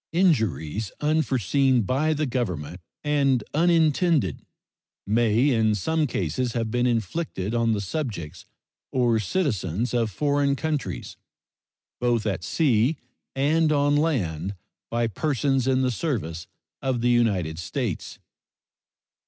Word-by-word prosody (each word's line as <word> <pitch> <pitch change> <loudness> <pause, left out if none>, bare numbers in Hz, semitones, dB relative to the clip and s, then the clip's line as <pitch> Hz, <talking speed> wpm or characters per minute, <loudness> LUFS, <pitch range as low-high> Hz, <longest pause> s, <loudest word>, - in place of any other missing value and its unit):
Injuries 110 - +1
unforeseen 135 - +2
by 135 +9 +1
the 155 +1 0
Government 90 - -3 0.2
and 140 -5 +2
unintended 160 - +2 0.6
may 115 +5 +3
in 110 -3 +2
some 155 - 0
cases 115 - -2
have 115 -2 -2
been 125 +1 +1
inflicted 115 - -2
on 115 -1 +2
the 105 - -1
subjects 95 - -5 0.5
or 120 -3 +2
citizens 110 - -1
of 115 -2 +1
foreign 140 +5 +1
countries, 150 -2 -3 0.8
both 120 -3 +1
at 95 -4 -2
sea 130 - +2 0.4
and 155 +4 +2
on 145 0 +3
land, 100 - 0 0.3
by 120 0 0
persons 135 - 0
in 130 0 +2
the 130 - +1
service 105 - -3 0.3
of 130 -3 -1
the 120 - +2
United 95 -10 +1
States. 110 - -4
120 Hz, 115 wpm, -25 LUFS, 105-145 Hz, 0.8 s, may